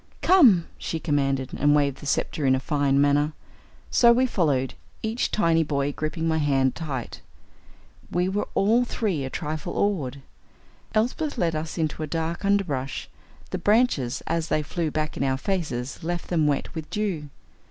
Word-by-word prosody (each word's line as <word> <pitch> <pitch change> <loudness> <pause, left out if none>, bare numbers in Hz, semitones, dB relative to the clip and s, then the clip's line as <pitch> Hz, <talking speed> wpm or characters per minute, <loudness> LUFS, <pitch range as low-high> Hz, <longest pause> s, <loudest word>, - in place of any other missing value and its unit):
"Come," 245 - +6
she 160 - -3
commanded, 135 -4 0
and 145 0 +3
waved 140 -2 +1
the 145 - -9
sceptre 145 +2 -1
in 130 - +5
a - - 0
fine 140 0 +1
manner. 145 +2 +3 0.6
So 235 -1 +6
we 250 +2 +4
followed, 145 - 0 0.3
each 225 +2 -1
tiny 165 -5 +2
boy 145 -2 0
gripping 160 +2 -2
my 160 -1 +1
hand 135 -3 +2
tight. 140 -7 -5 0.9
We 180 +1 0
were 200 +2 -1
all 225 +5 +4
three 205 - -1
a - - -4
trifle 155 +5 -4
awed. 140 -10 -1 0.7
Elsbeth 255 +7 0
led 170 -6 +1
us 155 +2 -4
into 160 -1 -1
a 155 - -2
dark 165 +3 -3
underbrush. 175 -10 -1 0.4
The - - -2
branches, 205 - +2
as 165 0 -1
they 155 - 0
flew 165 +1 -2
back 155 0 -3
in - - -1
our 130 -1 +1
faces, 140 -8 -3
left 175 +1 -3
them 160 -4 +2
wet 145 -2 -1
with 160 -2 -6
dew. 190 -9 -2
155 Hz, 165 wpm, -25 LUFS, 140-190 Hz, 0.9 s, Come